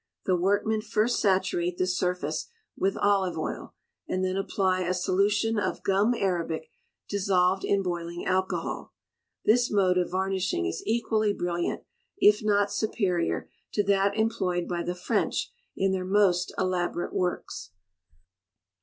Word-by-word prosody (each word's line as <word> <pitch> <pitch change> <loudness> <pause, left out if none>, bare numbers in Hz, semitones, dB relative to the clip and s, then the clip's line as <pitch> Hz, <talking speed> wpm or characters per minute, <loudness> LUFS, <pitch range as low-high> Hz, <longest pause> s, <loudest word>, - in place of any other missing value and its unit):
The 185 - +3
workmen 205 +4 +1
first 215 +2 +1
saturate 185 -3 +1
the 185 - +1
surface 180 0 -1 0.3
with 195 +1 0
olive 195 -4 +2
oil, 155 - -5 0.3
and 185 0 -1
then 185 0 -1
apply 190 -1 0
a 185 0 0
solution 205 +4 +1
of 185 -2 -2
gum 200 +5 +2
arabic 170 -6 -2 0.4
dissolved 190 -1 +2
in 200 -1 +1
boiling 175 -1 -4
alcohol. 185 0 -1 0.5
This 245 +3 +4
mode 185 -3 +3
of 180 - 0
varnishing 185 - -1
is 80 - -3
equally 220 -2 +1
brilliant, 175 -2 -2 0.3
if 210 - +5
not 205 -1 +2
superior, 185 -6 0 0.3
to 205 - +2
that 200 +1 +2
employed 185 -6 0
by 175 -1 -2
the 175 +1 -3
French 180 - -1 0.3
in 195 0 +2
their 190 -1 -1
most 185 -2 +2
elaborate 180 -1 -1
works. 180 -1 -2
190 Hz, 135 wpm, -27 LUFS, 180-205 Hz, 0.5 s, if